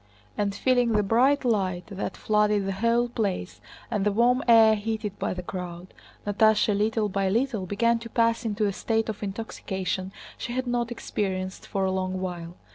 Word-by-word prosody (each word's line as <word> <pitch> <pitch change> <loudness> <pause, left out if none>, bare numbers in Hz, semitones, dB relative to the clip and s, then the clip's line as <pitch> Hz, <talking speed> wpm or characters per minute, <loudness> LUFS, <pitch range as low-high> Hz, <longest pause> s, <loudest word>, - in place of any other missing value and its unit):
And 200 -1 -1
feeling 245 0 +2
the 210 -1 +3
bright 255 +7 +3
light 190 -6 0
that 195 0 -4
flooded 210 -1 +2
the 195 - -1
whole 230 +5 +1
place 205 -6 -3 0.3
and 210 -4 0
the 210 - +2
warm 240 +5 +3
air 225 -2 +7
heated 215 -1 -3
by - - -1
the 180 - -5
crowd, 180 0 -7 0.3
Natásha 210 0 +3
little 215 +1 +1
by 195 -1 0
little 225 -2 0
began 230 +4 +2
to 230 0 -9
pass 230 +1 +1
into 215 -1 0
a 200 - 0
state 225 +2 -1
of 215 - -5
intoxication 190 -3 -4 0.3
she 240 - -4
had 255 +1 -1
not 240 -1 -1
experienced 190 -5 -3
for 195 -1 -1
a 190 - +1
long 185 0 -2
while. 175 -2 -5
210 Hz, 180 wpm, -26 LUFS, 190-230 Hz, 0.3 s, air